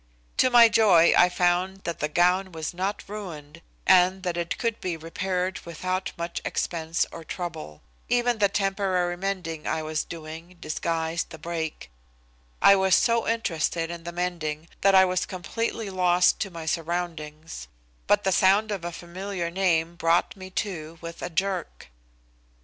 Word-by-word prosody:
To 255 - +5
my 240 -2 +8
joy 190 -7 +5
I 180 - +6
found 180 +2 0
that 170 -2 -4
the 150 - 0
gown 180 +4 +2
was 160 0 -5
not 190 +3 -3
ruined, 170 -7 -8 0.2
and 185 0 +5
that 175 -2 -1
it 170 -1 -2
could 230 -2 -2
be 175 -3 -2
repaired 180 +3 -2
without 185 +3 -3
much 170 0 -4
expense 165 -1 -1
or 165 - -8
trouble. 155 - -6 0.3
Even 245 -1 +2
the 200 -1 +4
temporary 195 -3 0
mending 175 -4 -4
I 160 - -1
was 155 0 -2
doing 165 +2 -9
disguised 165 +1 -2
the 160 - -9
break. 160 - -5 0.7
I 200 - +9
was 190 -1 +4
so 230 -1 +2
interested 170 -6 -1
in 170 -1 -7
the 175 - -5
mending 170 -3 -3
that 195 0 +5
I 190 0 +8
was 185 0 -1
completely 210 +3 -3
lost 180 -1 +3
to 195 - -2
my 165 -3 -8
surroundings, 160 - -4 0.4
but 205 0 +3
the 190 - +1
sound 200 +4 +4
of 195 -4 -3
a 175 - -3
familiar 175 +1 -5
name 170 -2 +1
brought 165 +1 +2
me 185 -1 -9 0.2
to 165 -4 -7
with 170 0 -8
a - - -3
jerk. 185 - -3
175 Hz, 160 wpm, -26 LUFS, 165-190 Hz, 0.7 s, I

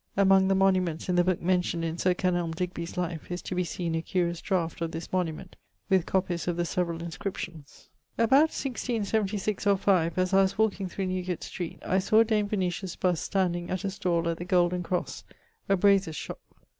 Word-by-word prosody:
Among 195 -1 +5
the 195 - +3
monuments 185 -4 +1
in 180 - +2
the 175 - +5
booke 185 -1 0
mentioned 175 -2 +1
in 165 +1 -3
Sir 180 -1 +2
Kenelm 175 -3 0
Digby's 175 -1 -4
life, 170 -3 -3
is 175 0 -4
to - - -4
be 180 0 +1
seen 170 -1 -3
a 165 - 0
curious 170 -1 -1
draught 170 -4 -1
of 165 - -1
this 165 +2 -7
monument, 170 -4 -2 0.4
with 190 -3 +3
copies 180 -3 -1
of 175 -1 -1
the 175 - 0
severall 170 -1 -2
inscriptions. 170 -3 -7 0.3
About 270 +7 +5
1676 215 -6 -2
or 200 -1 +5
5, 180 -4 +2
as 185 +1 +1
I 195 - +6
was 195 0 +1
walking 210 -3 +1
through 190 +2 -3
Newgate 185 -1 -3
street, 175 -3 -5
I 190 - +2
sawe 215 +4 +4
Dame 215 -2 +1
Venetia's 185 -2 -2
bust 180 -3 0
standing 175 -3 -1
at 185 +2 -2
a 195 - -1
stall 170 -3 0
at 165 -1 -1
the 175 - -5
Golden 180 -1 +2
Crosse, 180 +1 -3 0.5
a 195 - +4
brasier's 195 -4 +3
shop. - - -6
180 Hz, 195 wpm, -28 LUFS, 170-195 Hz, 0.5 s, I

